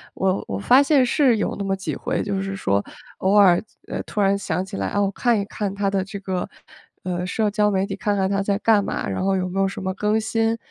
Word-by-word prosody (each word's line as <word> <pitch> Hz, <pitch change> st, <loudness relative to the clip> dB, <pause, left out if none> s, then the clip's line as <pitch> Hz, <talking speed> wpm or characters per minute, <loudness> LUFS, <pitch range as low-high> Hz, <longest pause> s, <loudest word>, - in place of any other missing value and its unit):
我 190 Hz, 0 st, 0 dB
我 95 Hz, -, -2 dB
发 255 Hz, -, +5 dB
现 275 Hz, -2 st, +4 dB
是 250 Hz, -2 st, +3 dB
有 210 Hz, -, -1 dB
那 200 Hz, -, -3 dB
么 195 Hz, 0 st, -1 dB
几 190 Hz, -1 st, -3 dB
回 -, -, -2 dB
就 200 Hz, -2 st, -2 dB
是 195 Hz, 0 st, -4 dB
说， 100 Hz, -, 0 dB, 0.4 s
偶 190 Hz, +1 st, +2 dB
尔， 195 Hz, -3 st, +6 dB, 0.2 s
呃， -, -, -4 dB
突 -, -, -5 dB
然 200 Hz, 0 st, +3 dB
想 190 Hz, -1 st, -2 dB
起 -, -, -8 dB
来， 95 Hz, -1 st, -2 dB
哦， 205 Hz, -1 st, +1 dB
看 240 Hz, -3 st, +2 dB
一 200 Hz, -, -2 dB
看 200 Hz, -1 st, -4 dB
他 200 Hz, 0 st, 0 dB
的 195 Hz, -1 st, 0 dB
这 200 Hz, +1 st, -7 dB
个， 185 Hz, -2 st, -3 dB, 0.5 s
呃， 180 Hz, -1 st, -2 dB
社 210 Hz, +3 st, 0 dB
交 210 Hz, 0 st, +2 dB
媒 195 Hz, -1 st, +1 dB
体， 195 Hz, 0 st, -5 dB
看 205 Hz, +1 st, 0 dB
看 190 Hz, -1 st, +1 dB
他 195 Hz, 0 st, 0 dB
在 200 Hz, 0 st, 0 dB
干 215 Hz, -2 st, +4 dB
嘛， -, -, -3 dB
然 -, -, -2 dB
后 195 Hz, 0 st, +2 dB
有 185 Hz, -1 st, -1 dB
没 190 Hz, +2 st, -3 dB
有 195 Hz, -, +3 dB
什 190 Hz, -, -6 dB
么 190 Hz, 0 st, -2 dB
更 210 Hz, +3 st, 0 dB
新， 225 Hz, +1 st, 0 dB
195 Hz, 275 characters per minute, -22 LUFS, 190-210 Hz, 0.5 s, 尔